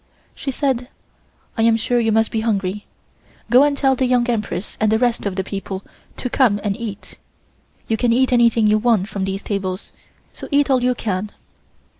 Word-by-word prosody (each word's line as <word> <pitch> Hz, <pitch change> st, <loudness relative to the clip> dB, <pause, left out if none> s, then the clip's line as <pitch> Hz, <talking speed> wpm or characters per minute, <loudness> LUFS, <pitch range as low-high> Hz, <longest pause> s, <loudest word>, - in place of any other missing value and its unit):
She -, -, -6 dB
said: 260 Hz, -2 st, -1 dB, 0.7 s
"I 225 Hz, -, -1 dB
am 225 Hz, 0 st, +4 dB
sure 240 Hz, +2 st, 0 dB
you 225 Hz, -1 st, +1 dB
must 220 Hz, 0 st, +2 dB
be 225 Hz, -, -1 dB
hungry. 205 Hz, -2 st, -2 dB, 0.6 s
Go 250 Hz, +2 st, +7 dB
and 285 Hz, 0 st, +2 dB
tell 270 Hz, -1 st, +3 dB
the 260 Hz, 0 st, 0 dB
Young 245 Hz, -1 st, +2 dB
Empress 215 Hz, -5 st, -3 dB
and 215 Hz, -1 st, +3 dB
the 220 Hz, -, +4 dB
rest 240 Hz, -3 st, 0 dB
of 195 Hz, -, -3 dB
the 190 Hz, -, -1 dB
people 195 Hz, 0 st, -5 dB, 0.3 s
to -, -, -3 dB
come 240 Hz, -5 st, +2 dB
and 205 Hz, -2 st, -1 dB
eat. 215 Hz, -4 st, -8 dB, 0.7 s
You 225 Hz, -, 0 dB
can 240 Hz, +1 st, +1 dB
eat 255 Hz, +2 st, +2 dB
anything 235 Hz, -2 st, +4 dB
you 215 Hz, 0 st, +4 dB
want 215 Hz, -4 st, +2 dB
from 195 Hz, -3 st, -3 dB
these 195 Hz, +1 st, -4 dB
tables, 190 Hz, -1 st, -4 dB, 0.4 s
so -, -, -9 dB
eat 285 Hz, -1 st, +2 dB
all 255 Hz, -2 st, +3 dB
you 250 Hz, 0 st, +1 dB
can." 205 Hz, -2 st, -3 dB
225 Hz, 195 wpm, -20 LUFS, 205-245 Hz, 0.7 s, Go